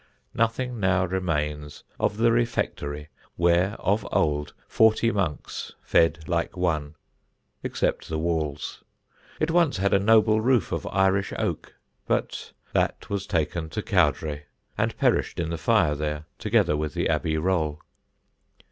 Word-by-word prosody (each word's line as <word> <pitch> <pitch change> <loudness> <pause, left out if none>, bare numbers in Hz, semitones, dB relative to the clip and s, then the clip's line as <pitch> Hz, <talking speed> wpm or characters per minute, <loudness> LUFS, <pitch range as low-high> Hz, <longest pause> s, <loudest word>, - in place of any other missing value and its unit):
Nothing 115 +1 -1
now 95 -1 +2
remains 75 -5 -3 0.2
of 105 - 0
the 115 +1 +4
Refectory, 75 -10 -1 0.3
where, 85 +4 +2
of 100 +3 0
old, 75 -1 0
forty 110 +1 +3
monks 90 -9 -3
fed 80 -1 +2
like 85 +1 -1
one, 80 -4 -1 0.7
except - - -2
the 80 - -2
walls. 80 -3 -2 0.6
It 155 +1 +1
once 165 - +3
had 100 +1 +1
a 100 - +5
noble 110 +1 +4
roof 125 -4 +2
of - - -3
Irish 95 0 +1
oak, - - -3 0.3
but - - -2 0.2
that - - -1
was 100 -1 -2
taken 80 -1 -1
to 105 +5 -4
Cowdray 75 -5 +1 0.3
and - - -1
perished - - +1
in 85 -1 -2
the 85 - -2
fire 85 -4 +3
there, 75 +1 -3
together 75 - +2
with 75 -2 -3
the - - 0
Abbey 80 0 0
roll. 80 -3 0
85 Hz, 140 wpm, -25 LUFS, 75-105 Hz, 0.7 s, a